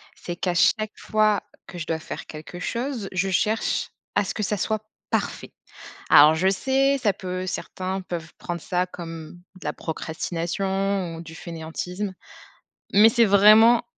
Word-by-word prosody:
C'est 175 - -6
qu'à 180 0 -1
chaque 215 +4 +3
fois 215 -2 +2 0.2
que 175 - -9
je 155 - -5
dois 165 - 0
faire - - -8
quelque 155 +3 -9
chose, 235 +1 -3
je 190 +1 0
cherche 215 +5 0 0.2
à - - +2
ce 195 - -4
que 215 - -2
ça 210 +1 -1
soit 215 +2 -1 0.3
parfait. - - -2 0.6
Alors 150 +2 +8
je 180 +4 +2
sais, 270 +7 +2
ça 215 -6 +1
peut 185 0 -5
certains 185 +1 -4
peuvent 170 -3 -6
prendre 175 0 -4
ça 180 -2 -1
comme 165 -3 -8 0.3
de - - -14
la - - -1
procrastination 175 +3 -2
ou - - -7
du 165 -1 -10
fainéantisme. 180 +4 -5 0.8
Mais 215 +3 +8
c'est 235 -1 +4
vraiment 215 +4 +7
185 Hz, 160 wpm, -24 LUFS, 170-210 Hz, 0.8 s, Alors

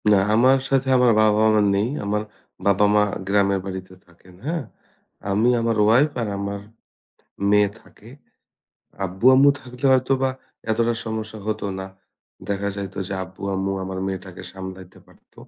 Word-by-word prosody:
না, 105 -2 +6 0.2
আমার 130 +4 +5
সাথে 135 -1 +1
আমার 125 -1 +5
বাবা 105 0 +3
মা 105 - +4
নেই। 105 +4 +1 0.2
আমার 105 +1 -1 0.4
বাবা 100 +1 +4
মা 105 - +5 0.2
গ্রামের 100 -1 +2
বাড়িতে 95 -1 -7
থাকেন, 90 +1 -20
হ্যাঁ? 165 0 -2 0.7
আমি 110 +5 +3
আমার 115 -1 0
ওয়াইফ 125 +8 +4
আর 115 - -2
আমার 100 0 -4 0.9
মেয়ে 105 -1 +4
থাকে। 110 - -17 1.0
আব্বু, 95 +5 -5
আম্মু 140 +2 +6
থাকলে 125 +1 -7
হয়তোবা 130 +1 +2 0.4
এতটা 115 +1 +1
সমস্যা 110 -1 -5
হতো 110 -1 -2
না। 95 - -5 0.6
দেখা 100 0 -1
যাইত 100 -1 -6
যে 100 - -4
আব্বু, 95 +2 -13
আম্মু 95 +1 -1
আমার 95 0 -5
মেয়েটাকে 95 -1 -6
সামলাইতে 95 -1 -9
পারত। - - -25
105 Hz, 145 wpm, -22 LUFS, 95-115 Hz, 1.0 s, না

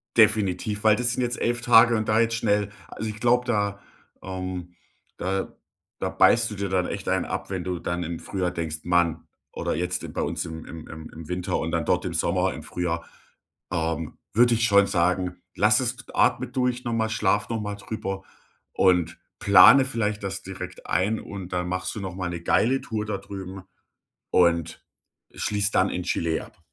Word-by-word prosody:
Definitiv, 105 -2 +2
weil 110 -1 +6
das 120 0 0
sind 125 - -1
jetzt 120 0 -1
11 120 0 0
Tage 120 -1 +6
und 110 - -2
da 110 - +4
jetzt 115 0 +2
schnell 105 -3 +1 0.2
also, 110 - -5
ich 105 - -7
glaube, 125 +1 +3
da 100 -4 0 0.4
ähm 90 -1 -5 0.4
da 95 +1 -2 0.5
da - - -1
beißt 115 -1 +4
du - - -5
dir 100 0 -3
dann 90 -1 +1
echt - - -4
einen - - +1
ab, - - -4
wenn 95 -2 -3
du 90 -1 -3
dann 85 0 -2
im 85 +1 -4
Frühjahr 90 -3 -2
denkst: 80 -2 -3
„Mann!“ 85 -2 +1 0.2
Oder - - -2
jetzt, 90 +2 -2
äh, - - -5
bei - - -4
uns - - -2
im 80 0 -7
im 80 -1 -9
im 80 0 -9
im 80 -1 -10
Winter 90 0 -1
und - - -2
dann - - 0
dort - - +1
im - - -3
Sommer, - - +1
im - - -8
Frühjahr, 85 -1 -3 0.7
ähm, 80 -2 -2 0.2
würde 120 +2 +5
ich 115 - 0
schon 100 -2 +5
sagen, 90 -1 0 0.2
lass - - +4
es - - -1 0.2
atme - - +2
durch 125 -1 -1
noch 120 - -1
mal, 110 -1 0
schlaf 105 -1 +1
noch 110 -2 -2
mal 105 -1 -4
drüber 95 -2 -5 0.5
und 90 -3 +2 0.2
plane 100 +7 +8
vielleicht 105 -5 -2
das 95 -1 -3
direkt 90 -1 -8
ein. 105 +4 +1
Und 95 -3 -8
dann 90 0 -1
machst 90 +1 -2
du - - -4
noch 95 -2 -5
mal 90 -2 -3
'ne 85 -1 -5
geile 130 +9 +2
Tour 110 -2 -3
da 105 -2 -2
drüben 95 -1 -8 0.7
und 85 -2 +2 0.5
schließt 105 0 -1
dann 95 +1 +4
in 90 - -3
Chile 85 -2 -1
ab. - - -18
95 Hz, 195 wpm, -25 LUFS, 90-110 Hz, 0.7 s, plane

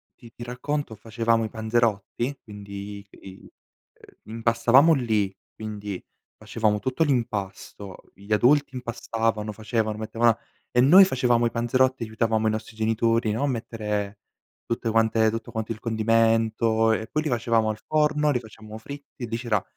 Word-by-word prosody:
ti 120 -2 -15
ti 120 - -8
racconto: 125 +2 -3
facevamo 115 +1 0
i - - -5
panzerotti, 115 +3 -1
quindi 100 -1 -8
i 95 -1 -13 0.4
ehm, - - -20 0.2
impastavamo 115 +7 +4
lì, 110 -8 0 0.2
quindi 105 -3 -6 0.3
facevamo 110 -2 -1
tutto 130 +7 0
l'impasto, 105 -7 -4
gli 100 +2 -14
adulti 135 +5 +3
impastavano, 115 -3 -2
facevano, 110 0 -2
mettevano 115 +2 +2
a 115 - -6 0.3
e 125 - +3
noi 185 +9 +8
facevamo 120 -6 +2
i - - +2
panzerotti, 130 +2 +1
aiutavamo 110 0 0
i 110 - +2
nostri 110 +1 -5
genitori, 115 +1 +1
no, 115 +6 -2
a - - +2
mettere 105 -5 -3 0.5
tutte 115 -1 -2
quante 110 0 +3
tutto 115 0 -6
quanto 110 0 -4
il 110 - -5
condimento, 115 0 +2
e 110 0 -1
poi 155 0 -2
li 155 - -2
facevamo 115 -2 +1
al 110 - -4
forno, 150 -1 +2
li 125 - 0
facevamo 110 -1 -11
fritti, 140 0 -9
lì 115 +1 -3
c'era 110 -5 -1
115 Hz, 150 wpm, -25 LUFS, 110-120 Hz, 0.5 s, noi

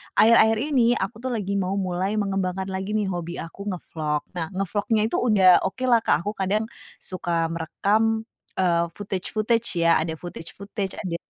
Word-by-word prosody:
akhir-akhir 220 0 +6 0.2
ini 240 -2 +4
aku 200 +1 -3
tuh 260 - -2
lagi 200 -3 -2
mau 190 0 -1
mulai 190 +1 -1
mengembangkan 190 -2 -1
lagi 190 +3 -3
nih, 210 -2 +1
hobi 175 -1 -4
aku 200 +5 -9
ngevlog. 155 -3 -3
Nah, 165 -2 -2
ngevlognya 205 +4 0
itu - - -1
udah 210 -6 +5 0.2
oke 255 +7 -6
lah, 235 - +6
Kak, - - +2
aku 205 - 0
kadang, 200 +3 +1 0.4
suka 170 -3 -2
merekam, 215 +7 0 0.3
eee, 170 -2 +2
footage-footage 210 +1 -1
ya, 165 -1 +5
ada 160 0 -2
footage-footage, 190 +4 -6
ada 175 -2 -4
195 Hz, 160 wpm, -24 LUFS, 175-215 Hz, 0.4 s, akhir-akhir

